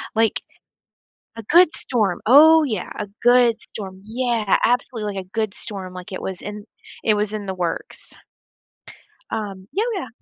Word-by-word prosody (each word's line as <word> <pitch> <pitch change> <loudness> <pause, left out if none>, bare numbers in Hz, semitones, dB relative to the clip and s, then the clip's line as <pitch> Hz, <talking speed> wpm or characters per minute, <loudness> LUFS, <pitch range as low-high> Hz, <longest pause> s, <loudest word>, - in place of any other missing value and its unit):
Like 225 -1 +2 1.0
A 225 - -7
good 345 -1 +6
storm. 210 -8 0
Oh, 315 +6 +7
yeah, 220 -10 -3
a 210 - -2 0.2
good 245 -1 +5
storm. 190 -2 -7
Yeah, 230 -3 0
absolutely, 225 -4 -1
like, 190 - -5
a 185 - -29
good 215 -3 -1
storm. 190 -4 -6
Like, 180 +3 -9
it 185 - -5
was 190 -1 -5
in 210 0 -7 0.4
it 215 - +3
was 210 0 -1
in 210 -2 -4
the 190 - -2
works. 175 -2 -4 1.2
Um, 195 -3 -5
oh, - - +3
yeah. 345 -9 -4
215 Hz, 160 wpm, -21 LUFS, 195-240 Hz, 1.2 s, Oh